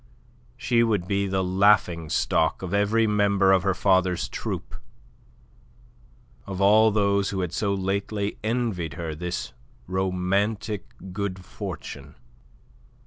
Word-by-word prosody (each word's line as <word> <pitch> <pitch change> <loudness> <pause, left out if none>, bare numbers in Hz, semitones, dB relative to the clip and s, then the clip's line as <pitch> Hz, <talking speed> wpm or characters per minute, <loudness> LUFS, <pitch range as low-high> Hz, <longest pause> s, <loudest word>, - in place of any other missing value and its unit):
She 120 -2 +2
would 105 -6 +1
be 100 0 0
the 95 0 0
laughing 90 -4 +3
stock 80 +4 +1
of 95 +1 -4
every 105 +3 +2
member 100 -2 +3
of 95 -1 +4
her 95 0 0
father's 95 -3 +2
troupe, - - -5 1.7
of 95 -1 -5
all 105 +3 +6
those 100 -2 +1
who 95 -1 -2
had 90 -2 -3
so 100 +2 0
lately 100 +2 -2
envied 110 - -2
her 85 -3 -4
this 90 +3 -4 0.3
romantic 95 +3 -1 0.3
good 100 -1 -3
fortune. 70 -3 -8
100 Hz, 120 wpm, -25 LUFS, 90-105 Hz, 1.7 s, all